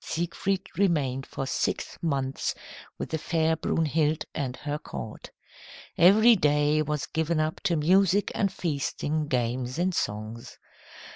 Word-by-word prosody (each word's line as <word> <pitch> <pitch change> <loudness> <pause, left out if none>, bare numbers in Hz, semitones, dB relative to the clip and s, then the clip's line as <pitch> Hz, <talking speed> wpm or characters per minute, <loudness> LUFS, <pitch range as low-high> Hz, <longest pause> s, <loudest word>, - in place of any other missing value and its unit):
Siegfried 180 +3 -2
remained 140 -9 +1
for 135 - -4
six - - -2
months 135 -5 -1 0.4
with - - -5
the 160 - -1
fair 160 0 +1
Brunhild 155 -1 0
and 130 -3 -3
her 150 0 -4
court. 110 -6 -8 0.7
Every 220 +7 +7
day 150 -2 +2
was 150 -1 -2
given 160 0 -1
up 155 0 -1
to 175 -3 +2
music 190 +5 +3
and 200 -3 0
feasting, 150 -1 -2
games 125 0 -1
and 180 +2 +1
songs. 110 -2 -4
155 Hz, 130 wpm, -27 LUFS, 135-170 Hz, 0.7 s, Every